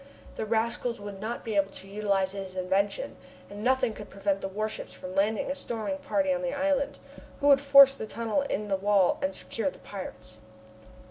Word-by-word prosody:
The 220 - -4
rascals 235 +1 0
would 205 -1 -7
not 230 +3 -4
be 220 -2 -2
able 195 -1 +3
to 190 - -8
utilize 195 -2 0
his 190 -1 -7
invention, 195 - 0 0.3
and 205 +1 -7
nothing 255 -2 +2
could 210 -1 -10
prevent 195 0 -1
the - - -2
warships 215 +3 -4
from 185 0 -8
landing 210 +6 +1
a - - +1
storming 260 +1 -4
party 285 0 +1
on 270 - -2
the 270 +1 -2
island, 280 -1 0 0.4
who 285 - -2
would 275 -1 +7
force 275 -1 +8
the 220 -5 -6
tunnel 230 +4 -1
in 215 -7 -2
the 195 -1 +1
wall 200 -1 +3
and 190 0 -1
secure 230 +8 -3
the - - -13
pirates! 110 - -9
215 Hz, 195 wpm, -28 LUFS, 195-265 Hz, 0.4 s, force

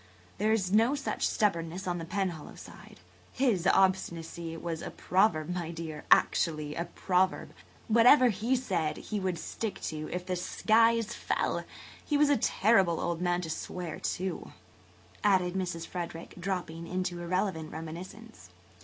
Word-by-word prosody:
There 215 +2 +2
is 195 -5 +1
no 225 +7 +4
such 280 - -1
stubbornness 175 -3 0
on 175 -1 -1
the 165 - -5
Penhallow 175 -4 -3
side. - - -13 0.3
His 225 -9 +1
obstinacy 170 -4 +1
was 165 -1 -4
a - - -5
proverb, 175 -5 +1
my 175 -2 -3
dear–actually 155 -1 +1
a 170 - -3
proverb. 185 +1 0 0.3
What 230 +1 +5
ever 255 -2 +8
he 225 +5 0
said 175 -11 -1
he 210 - -4
would 185 -3 -1
stick 205 +6 -4
to 155 -1 -4
if 180 0 -3
the 185 0 -1
skies 225 +5 +2
fell. - - -1 0.4
He 295 - +1
was 290 0 +4
a - - +5
terrible 195 -6 +3
old 170 0 -2
man 175 0 +1
to 165 - -5
swear, 175 0 -5
too," 185 -1 -3 0.7
added 185 -3 +3
Mrs. 180 -3 -3
Frederick, 170 -2 -6
dropping 175 -3 -4
into 180 -1 -3
irrelevant 175 -2 -1
reminiscence. 180 +8 -9
180 Hz, 145 wpm, -30 LUFS, 165-210 Hz, 0.7 s, ever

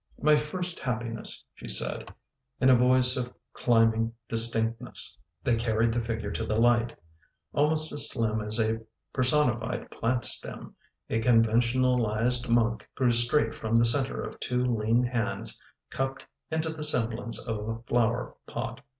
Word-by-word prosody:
" - - -25
My 150 +3 +5
first 175 +4 -3
happiness," 120 -2 -3
she - - -11
said, - - -2 0.5
in 130 0 +5
a - - +7
voice 125 +1 +4
of 125 -1 -3 0.2
climbing 115 -1 +2 0.2
distinctness. 115 0 +1 0.3
They 120 - +2
carried 115 0 +1
the 120 - 0
figure 110 -3 -4
to - - -3
the 110 +1 -1
light. 120 0 +2 0.6
Al 145 +1 +3
most 155 0 +4
as 145 - +2
slim 110 -3 -1
as 105 +2 -3
a 110 0 +1 0.3
personified 125 -3 +1
plant 120 +2 0
stem, - - -3 0.3
a 115 - -1
conventional 120 +2 +3
ised 120 +3 0
monk 115 -1 +1
grew 125 -2 +2
straight 120 +1 +2
from 110 +1 -2
the 115 0 +5
center 130 +3 +1
of - - -8
two 125 0 -1
lean 115 0 +1
hands 120 -2 -2 0.3
cupped 135 0 -3 0.2
into 160 0 -1
the 160 -1 -6
semblance 120 -4 +1
of 110 -1 -3
a 115 0 -4
flower 120 0 0
pot. 125 - -5
120 Hz, 155 wpm, -28 LUFS, 115-130 Hz, 0.6 s, a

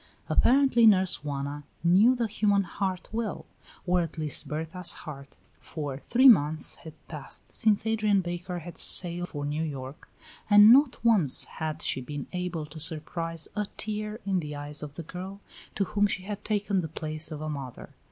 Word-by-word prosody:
Apparently 255 -3 +4
Nurse 190 -6 +3
Juana 145 0 -5 0.2
knew 195 +9 +5
the 240 -2 -1
human 205 -2 +1
heart 185 0 -4
well, 220 -2 -4 0.4
or 180 0 +2
at 165 -1 -6
least 155 -2 -2
Berta's 160 +3 -2
heart, 140 -3 -10 0.2
for 145 -4 -6
three 255 - +3
months 155 - +4
had 160 -2 -12
passed 150 -4 -7
since 215 0 +2
Adrian 215 -3 +1
Baker 175 +1 -5
had 175 +1 -7
sailed 175 0 +5
for 145 -1 -5
New 150 +2 -2
York, 140 -3 -7 0.4
and 205 +2 +8
not 270 -1 +4
once 195 - +4
had 155 -1 -6
she 130 - 0
been 140 +2 -6
able 180 -3 -4
to 150 +1 -11
surprise 165 +1 -4
a 210 -1 -2
tear 215 +1 -4
in 190 -2 0
the 150 -3 -6
eyes 145 +1 -2
of 145 -2 -8
the 170 - -7
girl 185 +4 -8 0.4
to 200 - +1
whom 205 +1 +1
she 185 -2 -4
had 205 +1 -6
taken 205 -2 -1
the 160 - -5
place 155 0 -1
of 155 -2 -7
a 155 - -5
mother. 140 -5 -7
175 Hz, 175 wpm, -27 LUFS, 150-205 Hz, 0.4 s, and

